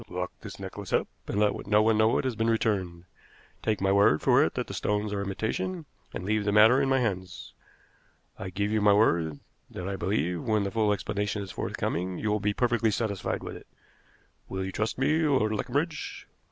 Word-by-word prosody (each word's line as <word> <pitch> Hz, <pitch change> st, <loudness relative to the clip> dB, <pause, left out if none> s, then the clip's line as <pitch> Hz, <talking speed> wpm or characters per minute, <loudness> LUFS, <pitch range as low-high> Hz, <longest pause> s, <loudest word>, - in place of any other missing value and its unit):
Lock 90 Hz, 0 st, -3 dB
this -, -, -9 dB
necklace -, -, -7 dB
up, -, -, +2 dB, 0.2 s
and 100 Hz, -, -1 dB
let 105 Hz, -1 st, +1 dB
no 105 Hz, +1 st, +4 dB
one 110 Hz, 0 st, +3 dB
know 110 Hz, +1 st, +4 dB
it -, -, 0 dB
has 130 Hz, -3 st, -1 dB
been 115 Hz, +1 st, 0 dB
returned. 95 Hz, -7 st, 0 dB, 0.6 s
Take 110 Hz, -2 st, 0 dB
my 95 Hz, 0 st, +2 dB
word 100 Hz, -6 st, +5 dB
for -, -, +4 dB
it -, -, -1 dB
that -, -, -1 dB
the -, -, -8 dB
stones 105 Hz, 0 st, -1 dB
are 100 Hz, -, -1 dB
imitation, 110 Hz, -, -3 dB, 0.3 s
and 90 Hz, -, -6 dB
leave 105 Hz, +1 st, +1 dB
the 105 Hz, -, 0 dB
matter 110 Hz, +6 st, +6 dB
in 135 Hz, -, +1 dB
my 135 Hz, -, +3 dB
hands. 95 Hz, -7 st, -3 dB, 0.9 s
I 95 Hz, -, -5 dB
give 100 Hz, +3 st, -2 dB
you 110 Hz, -1 st, +1 dB
my 105 Hz, 0 st, +5 dB
word 85 Hz, -8 st, +2 dB, 0.3 s
that 90 Hz, -, -6 dB
I 100 Hz, -, -2 dB
believe, 90 Hz, -2 st, -1 dB
when 110 Hz, -3 st, +1 dB
the 100 Hz, -, -2 dB
full 110 Hz, -1 st, +2 dB
explanation 105 Hz, 0 st, -2 dB
is 95 Hz, -, -8 dB
forthcoming, 90 Hz, +2 st, -3 dB
you 110 Hz, -, -1 dB
will 105 Hz, -, +1 dB
be 105 Hz, +1 st, +1 dB
perfectly 120 Hz, 0 st, +1 dB
satisfied 100 Hz, -3 st, -2 dB
with -, -, -6 dB
it. -, -, -12 dB, 0.8 s
Will 95 Hz, 0 st, -3 dB
you 95 Hz, -, -4 dB
trust 110 Hz, +3 st, -2 dB
me, 150 Hz, +5 st, +2 dB
Lord 135 Hz, -9 st, +2 dB
Leconbridge?" 145 Hz, +9 st, -3 dB
105 Hz, 205 wpm, -28 LUFS, 95-110 Hz, 0.9 s, matter